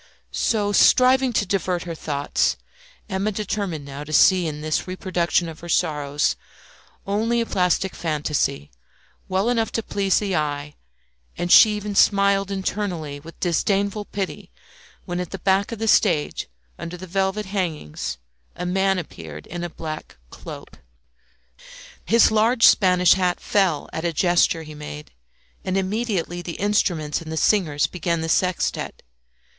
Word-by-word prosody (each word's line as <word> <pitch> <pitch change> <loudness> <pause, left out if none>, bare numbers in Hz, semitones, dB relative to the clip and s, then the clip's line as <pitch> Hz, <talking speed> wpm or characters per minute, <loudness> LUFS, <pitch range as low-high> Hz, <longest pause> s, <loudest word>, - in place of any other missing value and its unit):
So, 205 -3 0
striving 255 +4 +5
to 210 - +1
divert 185 -2 -1
her 170 - -5
thoughts, 145 -3 -1 0.5
Emma 195 +1 -1
determined 195 -7 -3
now 140 +1 -7
to 150 - -10
see 180 +3 +5
in 150 -1 -5
this 155 +3 -1
reproduction 180 -2 0
of 160 -1 -9
her 170 - -10
sorrows 145 -2 0 0.7
only 225 +4 0
a 230 - 0
plastic 185 -1 0
fantasy, 150 - -2 0.6
well 190 +3 +1
enough 230 -2 +1
to 225 - -1
please 195 -2 +1
the 200 -3 -1
eye, 145 -1 -2 0.6
and 175 0 -2
she 215 -1 +8
even 210 0 -4
smiled 200 0 +3
internally 185 -7 -3
with 165 +3 -13
disdainful 200 +4 0
pity 195 -2 -5 0.6
when 175 -1 -3
at 180 -2 -4
the 195 - -6
back 195 +3 +1
of 230 - -4
the 225 +1 -3
stage 170 -9 +2 0.3
under 175 +1 -6
the 185 - -8
velvet 190 +3 -1
hangings 160 - -3 0.4
a 180 - -5
man 190 +1 +1
appeared 80 - -8
in 175 0 -6
a 175 - -3
black 155 - -7
cloak. - - -10 1.3
His 230 -1 +5
large 230 +2 +4
Spanish 180 -2 +5
hat 180 -2 0
fell 190 -7 +1
at 160 - -4
a 170 - 0
gesture 170 -1 +2
he 155 -1 -10
made, 150 0 -9 0.5
and 185 0 -1
immediately 190 -3 -2
the 175 -1 -6
instruments 175 -7 0
and 160 -1 -8
the 160 - -3
singers 160 -7 +2
began 170 -1 -2
the 165 - -3
sextet. 180 +1 -1
180 Hz, 150 wpm, -23 LUFS, 160-200 Hz, 1.3 s, she